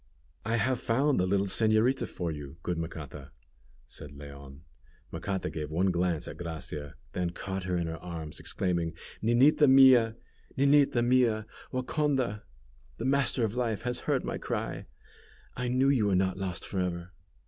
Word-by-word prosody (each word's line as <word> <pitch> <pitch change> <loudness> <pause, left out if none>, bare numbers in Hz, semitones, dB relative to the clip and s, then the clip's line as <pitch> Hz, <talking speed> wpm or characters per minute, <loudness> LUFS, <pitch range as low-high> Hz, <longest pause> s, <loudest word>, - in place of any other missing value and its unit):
"I 115 +2 0
have 125 +1 +1
found 135 +4 +2
the 90 - +2
little 100 +1 +2
señorita 110 +6 +2
for 85 -2 -3
you, 75 0 -8
good 90 -2 -2
Macata," 75 -4 -7 0.6
said 75 - -10
Leon. 70 -1 -11 0.5
Macata 95 -1 -3
gave 75 -2 -4
one 90 +4 +1
glance 85 -3 0
at - - -7
Gracia, 75 -3 -6 0.2
then 90 -1 -1
caught 95 +1 -5
her 90 -1 0
in 85 - -1
her 80 0 -5
arms, 80 -4 -6
exclaiming, 85 -3 -2 0.3
"Ninita 130 +6 +5
mia! 130 -4 +7 0.4
Ninita 140 -3 +4
mia! 120 -4 +3 0.3
Waconda! 130 -4 0 0.6
the 115 - -4
Master 135 -2 +2
of 110 - -3
Life 115 -4 -1
has 125 0 -1
heard - - +1
my - - -3
cry! - - -4 0.7
I 125 0 -2
knew 130 +2 +3
you 120 -7 +3
were 100 - +2
not 95 0 +1
lost 95 -2 -4
for 95 - -3
ever." 90 -1 -3
95 Hz, 160 wpm, -29 LUFS, 85-125 Hz, 0.7 s, mia